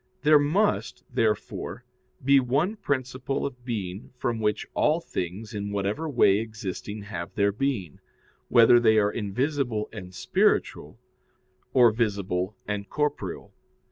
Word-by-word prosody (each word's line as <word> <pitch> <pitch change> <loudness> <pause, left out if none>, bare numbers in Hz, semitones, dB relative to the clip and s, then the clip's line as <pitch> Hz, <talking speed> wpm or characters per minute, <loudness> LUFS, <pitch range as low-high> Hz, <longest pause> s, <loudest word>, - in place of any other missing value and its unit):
There 150 0 +7
must, 185 +9 0
therefore, 110 +3 -1 0.4
be 140 0 +6
one 140 - 0
principle 130 - -2
of 125 -3 -6
being 105 -4 -5
from 120 -2 -1
which 105 -1 0
all 155 +2 +2
things 100 - -5
in 100 -1 -4
whatever 100 +10 -2
way 105 -7 +4
existing 105 -1 -6
have 105 +1 -6
their 100 -1 +3
being, 105 - -2 0.5
whether 120 +1 +7
they 110 -2 +4
are 105 -1 +3
invisible 120 +1 -1
and 95 -5 -8
spiritual, 95 - 0 0.7
or 120 -3 +6
visible 100 -4 -1
and 105 -1 -3
corporeal. 145 - -3
110 Hz, 125 wpm, -26 LUFS, 100-135 Hz, 0.7 s, There